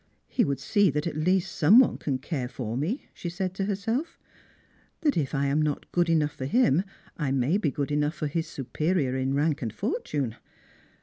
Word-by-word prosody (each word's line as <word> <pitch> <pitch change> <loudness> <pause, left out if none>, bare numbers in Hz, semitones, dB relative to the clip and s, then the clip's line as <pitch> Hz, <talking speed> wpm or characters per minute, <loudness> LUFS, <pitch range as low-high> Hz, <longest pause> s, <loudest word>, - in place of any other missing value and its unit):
" - - -46
He - - +6
would 140 -2 -1
see 200 +8 +3
that 150 +1 -1
at 165 - -3
least 180 +4 +1
some 180 +8 +6
one 260 - +5
can 135 -3 -1
care 130 -1 -3
for 115 -3 -4
me," 170 - -2
she 175 - -5
daid 185 +1 -3
to 195 0 -2
herself; 225 - -2 0.4
" - - -35
that 295 -3 +2
if 145 -3 -1
I 140 +1 +1
am 140 +2 +2
not 150 -2 -2
good 175 -1 +2
enough 155 -3 +2
for 130 - -5
him, 195 - +3 0.3
I 150 -5 -1
may 135 +8 +2
be 165 - +1
good 140 +1 -3
enough 150 +2 +1
for 155 - -3
his 160 +3 -2
superior 145 0 -1
in 130 +1 0
rank 150 +1 +1
and 115 -4 -2
fortune." 145 - -2
155 Hz, 210 wpm, -27 LUFS, 140-185 Hz, 0.4 s, He